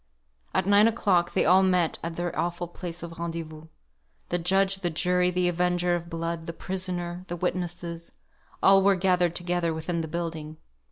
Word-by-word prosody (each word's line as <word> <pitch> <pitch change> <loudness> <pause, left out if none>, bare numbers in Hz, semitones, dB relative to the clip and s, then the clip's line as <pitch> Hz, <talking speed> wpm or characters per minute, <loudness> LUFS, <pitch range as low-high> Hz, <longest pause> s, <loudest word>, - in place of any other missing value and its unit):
At - - +2
nine 205 +2 +6
o'clock 190 -6 +1
they - - +2
all 185 +3 +6
met 180 -3 +2
at 165 0 -4
their 175 0 -3
awful 175 +2 -2
place 175 0 -7
of 165 -1 -8
rendezvous. 165 -2 -5 0.6
The 175 - 0
judge, 195 +3 +2
the 185 -2 -1
jury, 180 +2 +1
the 180 0 +1
avenger 175 0 +1
of 170 0 -3
blood, 165 -1 -4
the 170 - -4
prisoner, 180 -1 -3
the 175 - -4
witnesses 175 -1 -3 0.5
all 195 0 +7
were 195 0 +4
gathered 180 -2 +2
together 175 -2 -1
within 165 +1 -2
one 160 - -5
building. 160 -2 -4
175 Hz, 170 wpm, -27 LUFS, 170-180 Hz, 0.6 s, all